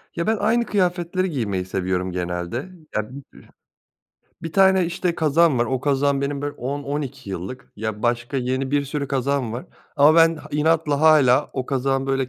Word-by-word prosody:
Ya, 170 - -2
ben 220 0 +2
aynı 235 +3 +1
kıyafetleri 185 -2 0
giymeyi 100 - -2
seviyorum 95 -1 -2
genelde. 90 - -4 0.3
Ya, 110 0 -1
bü 135 +3 -9 1.2
bir 165 - -5
tane, 190 -1 +5
işte, 175 0 -2
kazağım 160 -2 +3
var. 120 - +3
O 130 +1 -1
kazağım 140 0 +1
benim 140 0 -2
böyle 145 - -2
10-12 140 -3 -4
yıllık. 95 +9 -7
Ya, 110 0 -4
başka 120 +3 -1
yeni 130 +1 -1
bir 145 0 +1
sürü 140 0 -4
kazağım 135 -3 -1
var 120 +3 -6 0.3
ama 145 +2 +6
ben 165 0 +5
ha - - -11
inatla 150 -1 +1
hâlâ. 150 -4 +5
O 130 - -3
kazağın 135 0 0
böyle 135 -1 0
140 Hz, 170 wpm, -22 LUFS, 120-160 Hz, 1.2 s, ama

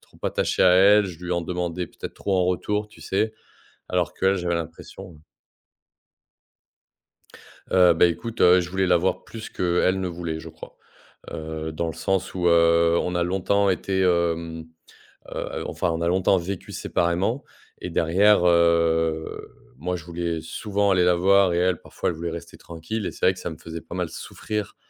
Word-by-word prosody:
trop - - -23
attaché - - 0
à 95 - +7
elle. 100 +2 +6
Je 85 -4 -8
lui 90 - -2
en 85 - 0
demandais 90 0 -3
peut-être - - -9
trop 100 -2 -1
en 90 - +2
retour, 105 +3 -1
tu - - -18
sais? 110 +3 0 0.6
Alors - - 0
qu'elle, 95 +1 +2
j'avais 85 -1 -1
l'impression 85 +2 -8 2.6
Heu, 90 -2 +6
ben, 85 +1 +4
écoute, 115 +6 -6
heu, 90 +1 +6
je 85 0 -5
voulais 95 0 0
la 90 -1 +4
voir 90 +3 -1
plus 115 -1 -9
qu'elle 90 +1 +1
ne 95 - -2
voulait, 85 -2 -5
je 80 - -9
crois. 80 - -13 0.5
Heu, 80 0 -5
dans 85 +1 -2
le - - -4
sens 95 -1 -2
où, 90 -1 -1
heu, 85 0 +4
on 90 - -2
a 90 - +1
longtemps 95 +2 +1
été, 95 +1 -1
hem, 85 -2 0 0.7
heu - - -8 0.2
heu, - - -5
enfin, 90 - -1
on 80 - -2
a 85 - 0
longtemps 95 +1 +3
vécu 90 +2 -6
séparément 90 +10 -1 0.4
et - - -5
derrière, 95 +4 +3
heu, 85 -2 +2 0.3
moi 90 +4 -2
je 80 - -10
voulais 85 -1 -3
souvent 100 +4 -1
aller 90 -1 +3
la 90 - +4
voir 95 +1 +4
et 85 - 0
elle 90 -1 +1
parfois - - -4
elle 90 - -1
voulait 85 +1 -4
rester 85 -1 -8
tranquille 85 +6 -6
et - - -2
c'est - - -1
vrai 95 - +4
que - - -13
ça - - -4
me 80 - -9
faisait 80 -1 -8
pas 80 - -10
mal 90 -2 -2
souffrir, 105 +5 -6
90 Hz, 190 wpm, -24 LUFS, 85-95 Hz, 2.6 s, à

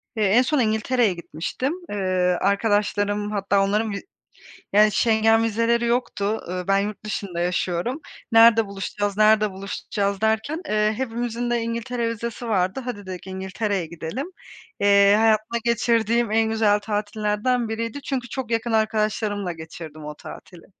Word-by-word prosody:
Eee, 215 - 0
en 215 +6 +5
son 295 +2 +1
İngiltere'ye 220 -1 +2
gitmiştim. 175 - -4 0.2
Eee, 185 -3 0
arkadaşlarım 205 0 +1
hatta 200 -1 +1
onların 210 +2 0
vi 200 - -4 0.7
yani, 210 +1 +6
Schengen 225 +1 +3
vizeleri 230 +2 +1
yoktu. 220 -3 -1
Iıı, 180 0 -4
ben 195 0 +3
yurt 210 +1 -4
dışında 195 -4 -4
yaşıyorum. 180 - -1 0.3
"Nerede 225 -1 +7
buluşacağız, 200 +1 -3
nerede 215 -1 +4
buluşacağız?" 200 +1 -3
derken, 220 +10 0
eee, 215 0 +2
hepimizin 240 -1 -3
de 240 -1 +1
İngiltere 230 +1 -2
vizesi 235 +1 -5
vardı. 190 +2 0
"Hadi," 205 -5 -5
dedik, 185 0 -8
"İngiltere'ye 190 0 -2
gidelim." 170 - -6 0.5
Eee, 200 0 +5
hayatımda 220 +1 +2
geçirdiğim 235 -1 +1
en 220 0 +2
güzel 215 -2 +3
tatillerden 215 +3 -1
biriydi 230 +5 -4
çünkü 255 -4 -3
çok 250 -2 -5
yakın 230 +1 0
arkadaşlarımla 215 -3 0
geçirdim 160 -1 -9
o 150 0 -6
tatili. 170 +2 -12
215 Hz, 140 wpm, -23 LUFS, 200-230 Hz, 0.7 s, Nerede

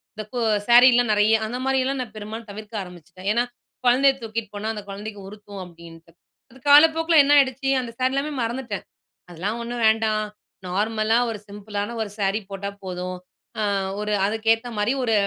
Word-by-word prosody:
இந்த 215 - -5
கோ 245 - -2 0.3
சாரீலாம் 245 -1 +6
நெறைய, 210 +1 +4
அந்த 240 +3 -4
மாரியல்லாம் 265 0 +1
நா 250 - -4
பெரும்பாலும் 215 +1 -7
தவிர்க்க 210 +1 -6
ஆரம்பிச்சுட்டேன். 180 +1 -8
ஏன்னா, 235 +2 +2 0.4
"கொழந்தைய 265 +3 +5
தூக்கிட்டு 225 -2 -5
போனா, 215 +2 -3
அந்த 210 - -6
கொழந்தைக்கு 205 +1 -7
உறுத்தும்" 205 -1 -10
அப்படீன்ட்டு. 170 -1 -14 0.4
அது 260 - -16
காலப்போக்கில 320 +2 +7
என்ன 280 - +1
ஆயிடுச்சு? 270 0 +1
"அந்த 240 -2 -6
சாரி 255 +1 +1
எல்லாமே 290 +2 -1
மறந்துட்டேன். 235 -3 -4 0.4
அதெல்லாம் 195 +7 -4
ஒண்ணு 240 +1 -5
வேண்டாம். 220 -1 +2 0.4
நார்மலா 215 +4 +1
ஒரு 220 -2 -5
சிம்பிளான 205 +2 -5
ஒரு 215 - -3
சேரி 195 +1 +1
போட்டா 200 0 -4
போதும். 180 0 -5 0.4
ஆ - - 0 0.4
ஒரு 210 0 -2
அதுக்கேத்த 225 +3 +1
மாரி 210 +5 +1
ஒரு, 230 -2 +1
220 Hz, 160 wpm, -23 LUFS, 205-245 Hz, 0.4 s, காலப்போக்கில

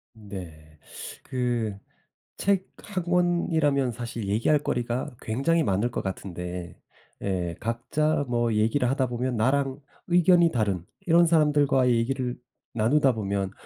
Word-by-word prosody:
네 85 -8 -10 0.5
그 120 -5 -2 0.6
책 195 -1 +1 0.2
1 190 -3 -4
권이라면 165 -6 +2
사실 115 -2 -5
얘기할 115 +9 +2
거리가 125 0 -2
굉장히 140 +9 +1
많을 105 +1 0
것 - - -2
같은데 90 -2 -6 0.5
예 90 -4 -2
각자 145 +7 0
뭐 120 -2 +1
얘기를 115 +4 +2
하다 130 -1 +1
보면 125 0 -2
나랑 135 +3 +1 0.3
의견이 175 -1 +5
다른 100 -7 0 0.2
이런 170 0 +5
사람들과의 145 -6 +3
얘기를 125 +1 -1 0.4
나누다 130 +5 +3
보면 100 -3 -2
125 Hz, 250 characters per minute, -26 LUFS, 105-150 Hz, 0.6 s, 의견이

